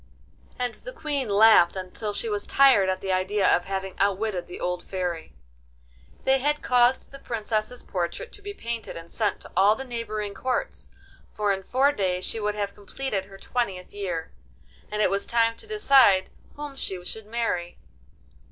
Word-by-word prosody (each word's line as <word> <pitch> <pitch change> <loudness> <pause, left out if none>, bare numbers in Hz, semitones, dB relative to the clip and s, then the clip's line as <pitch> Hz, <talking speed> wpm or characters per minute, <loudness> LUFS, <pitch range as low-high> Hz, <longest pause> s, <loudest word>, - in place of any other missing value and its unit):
And 245 -2 -1
the - - -10
Queen 290 - -2
laughed 200 -4 +6
until 190 +3 -4
she 330 - -2
was 415 -2 -1
tired 260 -9 +5
at 185 0 -1
the 190 - -2
idea 190 +2 +2
of 175 - -2
having 195 -1 -3
outwitted 200 -1 0
the 175 - -8
old 180 0 -2
Fairy. 175 - -4 0.9
They 265 0 +4
had 295 +3 0
caused 250 +1 +3
the 275 - -10
Princess's 225 0 -3
portrait 180 - -3
to 410 - -9
be 405 0 -6
painted 235 - -5
and 165 0 -10
sent 215 -3 -1
to - - -11
all 205 +2 +5
the 265 - -6
neighbouring 215 -4 -4
Courts, 255 +6 -2 0.4
for 205 -1 +1
in 195 - -3
four 265 +8 +3
days 185 -7 -1
she 225 - -3
would 210 0 -1
have 200 -1 -2
completed 205 0 -4
her 195 0 -13
twentieth 195 -5 -3
year, 180 -5 -4 0.6
and 210 0 +1
it - - +3
was 200 0 0
time 230 -1 +2
to 440 - -11
decide 270 - +5 0.2
whom 290 -1 -7
she 185 -8 -3
should 220 +3 -5
marry. 215 -7 -2
210 Hz, 175 wpm, -26 LUFS, 190-250 Hz, 0.9 s, laughed